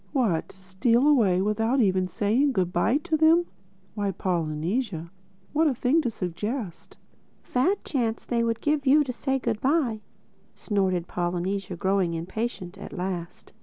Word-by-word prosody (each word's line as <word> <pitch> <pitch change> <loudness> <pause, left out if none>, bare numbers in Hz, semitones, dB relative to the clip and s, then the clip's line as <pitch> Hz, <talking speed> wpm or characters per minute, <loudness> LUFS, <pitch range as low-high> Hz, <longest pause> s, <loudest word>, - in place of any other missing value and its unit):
"What, 225 - 0
steal 190 +8 +1
away 205 -11 +4
without 225 +5 +1
even 185 -4 +2
saying 225 +10 +1
good 180 -4 0
bye 220 +9 +2
to 340 -3 0
them! 320 +3 +5 0.5
Why, 205 -2 -1
Polynesia, 170 +1 -2 0.4
what 315 +2 +3
a 275 - +1
thing 265 +7 +2
to 255 - -1
suggest!" 205 +1 -5 0.5
"A - - -29
fat 320 +11 +1
chance 230 -5 -1
they 235 -1 0
would 230 -1 -1
give 295 -2 0
you 295 +3 +6
to 255 -3 -4
say 270 +2 -1
good 230 -4 -2
bye!" 260 -6 +1 0.5
snorted 185 -4 -1
Polynesia 180 +2 -2
growing 190 -2 +1
impatient 185 +2 -4
at - - -9
last. 180 -3 -5
215 Hz, 150 wpm, -26 LUFS, 185-260 Hz, 0.5 s, you